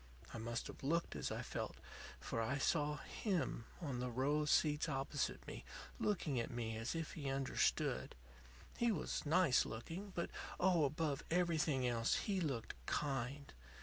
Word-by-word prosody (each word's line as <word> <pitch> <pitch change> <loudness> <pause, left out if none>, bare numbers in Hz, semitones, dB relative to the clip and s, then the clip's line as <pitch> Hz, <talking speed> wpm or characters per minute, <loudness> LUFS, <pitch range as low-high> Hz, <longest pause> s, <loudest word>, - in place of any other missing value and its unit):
I 115 - -4
must 115 +1 -2
have - - -8
looked 165 +5 +1
as - - -2
I - - -2
felt, - - -3 0.4
for 115 - -2
I 130 +5 +1
saw 150 +1 +2
him 180 - -1
on 140 -7 -2
the 125 0 -1
row 135 +5 +2
of 150 -1 +1
seats 150 +1 +4
opposite 135 0 -1
me, - - -6 0.4
looking 160 -10 +1
at 115 - -1
me 115 -2 -2
as 115 +7 -2
if 165 -1 -2
he 140 -4 -3
understood. 135 0 +1 0.6
He 235 -1 +3
was 160 -4 -1
nice 165 -4 +5
looking, 165 - -5
but 170 - -1 0.3
oh, 175 -4 +5
above 150 -1 0
everything 160 -6 +2
else, 115 -1 +2
he 195 -3 0
looked 135 -8 -1
kind. 140 0 -1
145 Hz, 160 wpm, -39 LUFS, 125-165 Hz, 0.6 s, nice